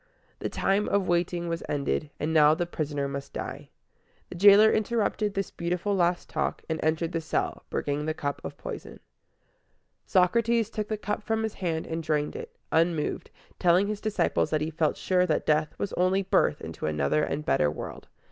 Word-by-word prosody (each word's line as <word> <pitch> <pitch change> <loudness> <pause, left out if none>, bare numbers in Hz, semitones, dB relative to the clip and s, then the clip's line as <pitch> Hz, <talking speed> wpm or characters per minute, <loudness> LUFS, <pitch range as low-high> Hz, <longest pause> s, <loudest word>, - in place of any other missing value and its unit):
The - - -3
time 200 +2 +1
of 200 -2 +1
waiting 175 0 0
was 165 0 -2
ended, 145 +1 -1
and 155 +2 -1
now 155 -1 +6
the 175 - -1
prisoner 145 -4 -3
must 140 0 -6
die. - - -6 0.6
The - - -8
jailer 205 +4 +7
interrupted 215 -1 0
this 195 -1 -2
beautiful 180 +4 -1
last 175 -1 +1
talk, 155 - -2
and 160 -1 -2
entered 160 +2 0
the 165 -1 -2
cell, 160 - -2
bringing 145 +1 -2
the 155 - -1
cup 145 -1 -3
of - - -7
poison. - - -7 1.1
Socrates 225 +4 +2
took 215 -1 -3
the 215 - -2
cup 210 0 -3
from 220 +1 -1
his 220 - -2
hand 165 -4 -2
and 165 0 -3
drained 150 -2 -1
it, 470 0 -8 0.2
unmoved, 165 -2 +1 0.3
telling 180 +2 +4
his 210 0 -3
disciples 215 -1 +1
that 155 -1 0
he 155 +1 -2
felt 155 0 0
sure 180 -1 +2
that 155 - 0
death 155 +1 +1
was 200 - -3
only 185 +2 +2
birth 75 - +2
into - - -5
another 75 - +1
and 150 +1 -2
better 75 - +3
world. 75 - -7
170 Hz, 185 wpm, -27 LUFS, 155-200 Hz, 1.1 s, jailer